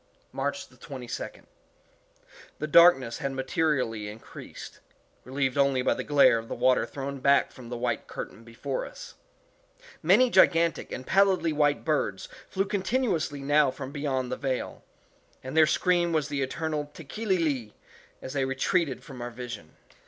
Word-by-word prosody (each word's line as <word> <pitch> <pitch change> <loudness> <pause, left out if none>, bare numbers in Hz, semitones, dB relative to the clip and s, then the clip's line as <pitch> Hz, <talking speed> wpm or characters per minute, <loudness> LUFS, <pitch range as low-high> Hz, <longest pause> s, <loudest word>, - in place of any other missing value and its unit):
March - - -3
22d. - - -8 1.1
The - - -3
darkness 155 -7 +5
had 140 -1 -3
materially 130 -6 -1
increased, 105 +2 -11 0.4
relieved 135 +1 -1
only 135 -2 +3
by - - +3
the - - -4
glare 140 -5 +5
of 115 - -9
the - - -4
water 130 -1 +2
thrown 140 0 -5
back 140 +1 +3
from 120 -2 -12
the 120 - -4
white 120 - -2
curtain 115 - -8
before 115 - -4
us. - - -10 0.9
Many 215 +10 +5
gigantic 170 -3 +3
and 130 - -6
pallidly 190 -4 +3
white 145 -1 +1
birds 145 -11 -1 0.2
flew 195 +1 0
continuously 195 - -1
now 145 0 +3
from 130 +1 -7
beyond 135 -4 -2
the 125 - -2
veil, 130 -2 -3 0.6
and 130 +3 -6
their 160 -1 +6
scream 175 0 +2
was 155 -3 0
the 145 -1 -2
eternal 150 +2 -2
_Tekeli 190 +6 -2
li!_as 130 -4 -5
they 140 -2 0
retreated 135 +2 0
from 130 -3 -10
our 120 - -4
vision. 120 -9 -8
140 Hz, 145 wpm, -27 LUFS, 130-170 Hz, 1.1 s, their